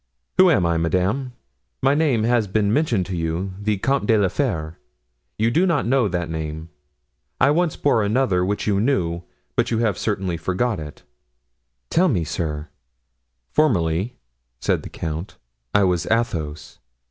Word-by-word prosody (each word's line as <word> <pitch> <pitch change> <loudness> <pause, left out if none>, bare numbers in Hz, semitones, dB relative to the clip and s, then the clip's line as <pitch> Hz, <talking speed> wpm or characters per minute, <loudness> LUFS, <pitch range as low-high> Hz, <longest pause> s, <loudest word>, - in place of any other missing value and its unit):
"Who 185 0 +8
I 165 - +5
am, 85 -2 +1
madame? 95 +10 0 0.5
My 135 +1 +4
name 145 -7 +2
has 115 -2 +2
been 100 +1 +1
mentioned 120 - +1
to 95 - -4
you—the 95 +5 -2
Comte 135 +8 0
de 115 -2 +4
la 100 -3 +2
Fere; 85 - -2 0.6
you 110 +2 +2
do 175 +8 +3
not 165 -5 +1
know 125 -1 +3
that 90 -3 -2
name. 80 0 -5 0.7
I 140 - +5
once 170 +1 +1
bore 140 -6 +2
another, 105 -3 +2
which 100 +3 -1
you 100 -2 +2
knew, 85 -10 0 0.3
but - - +1
you 115 - 0
have 110 -5 0
certainly 95 -5 -1
forgotten 95 0 -1
it." 75 - -14 0.9
"Tell 185 +3 +4
it 150 - +2
me, 90 -5 0
sir." 75 -1 -3 0.8
"Formerly," 100 - +1 0.4
said - - 0
the - - -9
count, 80 +4 -5 0.3
"I 100 - +4
was 90 -2 +1
Athos." 85 -11 -2
100 Hz, 160 wpm, -22 LUFS, 85-125 Hz, 0.9 s, Who